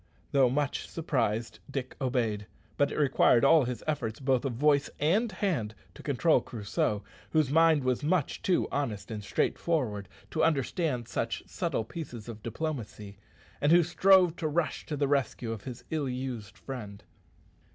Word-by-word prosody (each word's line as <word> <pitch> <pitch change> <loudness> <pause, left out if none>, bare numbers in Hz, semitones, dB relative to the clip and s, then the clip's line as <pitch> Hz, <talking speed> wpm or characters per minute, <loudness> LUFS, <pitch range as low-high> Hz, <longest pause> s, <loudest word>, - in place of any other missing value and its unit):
Though 135 -3 +5
much 140 +2 -1
surprised, 120 -9 -1
Dick 135 -2 -4
obeyed, 115 -6 0 0.3
but 145 0 +2
it - - -4
required 135 -3 +4
all 155 -1 +6
his 125 0 -4
efforts, 130 -8 -2
both 130 -2 +1
of 135 - -1
voice 145 +3 +3
and 205 +10 +2
hand, 165 - -1 0.2
to - - -12
control - - +3
Crusoe, 105 -1 -2 0.3
whose 155 -4 +2
mind 160 -2 +5
was 130 +2 0
much 160 -1 0
too 185 - +2
honest 120 -8 -3
and 105 -2 -5
straightforward 105 - -1 0.2
to - - +1
understand 140 -4 0
such - - -2
subtle - - -2
pieces 120 -4 -7
of 110 -2 -8
diplomacy, 115 -6 -5 0.4
and 145 - +3
who 175 +1 +7
strove 180 0 +5
to 160 - -1
rush 155 +1 -1
to 150 - -3
the 140 0 +1
rescue 135 -4 0
of 110 -3 -6
his 125 -3 -7
ill 150 -4 -1
used 125 -5 -5
friend. 105 -6 -7
135 Hz, 160 wpm, -29 LUFS, 115-155 Hz, 0.4 s, who